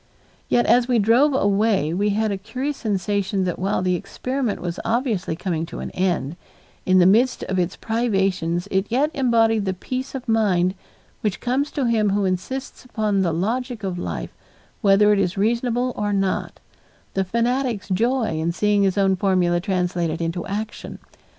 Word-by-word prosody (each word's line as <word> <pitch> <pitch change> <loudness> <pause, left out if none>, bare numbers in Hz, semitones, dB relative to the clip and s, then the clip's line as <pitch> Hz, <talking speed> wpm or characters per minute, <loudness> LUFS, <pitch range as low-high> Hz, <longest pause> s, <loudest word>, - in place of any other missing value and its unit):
Yet 240 - +3
as 245 0 +4
we 250 -2 +2
drove 240 +7 +4
away 200 - +2
we 205 +4 +1
had 215 +1 0
the 200 - -1
curious 265 +8 -4
sensation 200 -2 -1
that 180 -2 -2
while 190 0 0
the 185 0 +1
experiment 250 +6 -3
was 175 -1 -4
obviously 225 - -1
coming 170 -2 -2
to - - -8
an - - -5
end, 175 -4 -1 0.5
in 185 0 +5
the 180 - +6
midst 235 +7 +3
of 190 -1 -1
its 175 0 -1
privations 195 -6 0
it 190 +1 +1
yet 275 +6 +1
embodied 225 -6 +2
the 190 -1 -1
peace 255 +8 -5
of 255 -2 -6
mind 190 -5 +2 0.5
which 210 -3 -1
comes 265 +4 0
to 280 -4 0
him 220 -3 +2
who 200 0 +1
insists 190 +9 -3
upon 215 -5 0
the 175 -3 +1
logic 225 +7 -2
of 185 -2 -3
life - - -5 0.5
whether 210 0 +5
it 205 - +2
is 180 -2 0
reasonable 240 +4 0
or 205 0 -1
not 195 -1 -1 0.5
the 195 - +1
fanatic's 235 +1 -1
joy 225 -3 0
in 165 +2 0
seeing 205 +3 +1
his 195 0 +1
own 195 -1 +3
formula 180 -2 +2
translated 175 -3 -1
into 170 +1 -2
action. 215 +2 -5
205 Hz, 170 wpm, -22 LUFS, 185-235 Hz, 0.5 s, the